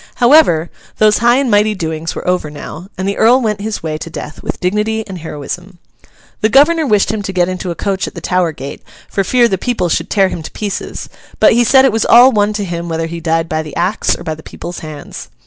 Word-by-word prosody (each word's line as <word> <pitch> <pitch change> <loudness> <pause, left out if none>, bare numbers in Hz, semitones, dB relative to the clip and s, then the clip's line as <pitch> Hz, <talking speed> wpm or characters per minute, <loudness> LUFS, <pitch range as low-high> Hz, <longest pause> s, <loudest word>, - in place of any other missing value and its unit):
However, 240 - +4 0.3
those 215 -1 +4
high 240 +2 +4
and 265 -2 +1
mighty 210 +1 +3
doings 160 -2 -4
were - - -6
over 180 -4 0
now, 150 +4 -9
and 190 - -2
the 200 - -2
Earl 245 +3 +5
went 210 -4 -2
his 215 -3 -4
way 155 -1 -3
to 165 - -7
death 150 - -8
with - - -5
dignity 210 +4 -1
and 190 -3 -8
heroism. 170 +4 -7 0.6
The 215 - +3
governor 305 +5 +4
wished 210 -4 +2
him 220 -1 -3
to 195 - -4
get 180 -2 +1
into 185 0 -4
a 170 - -3
coach 195 0 -2
at - - -9
the - - -5
Tower 180 -2 0
gate, 140 -2 -8 0.3
for 195 - -1
fear 240 +5 +3
the 190 -5 -2
people 240 -7 -1
should 165 +1 -1
tear 195 -3 +3
him 170 - -5
to - - -7
pieces; 205 -2 -5 0.3
but - - +6
he 240 +2 +4
said 265 +3 +5
it 265 - +4
was 225 +1 0
all 245 +3 +7
one 210 -2 +2
to 205 -1 -3
him 170 -1 -5
whether 165 0 -2
he 170 +1 -6
died 165 0 0
by 155 -1 -1
the 155 -1 -9
axe 185 +5 0
or - - -10
by 160 -2 -3
the 155 - -11
people's 175 +2 -8
hands. 155 -2 -9
190 Hz, 245 wpm, -15 LUFS, 165-220 Hz, 0.6 s, all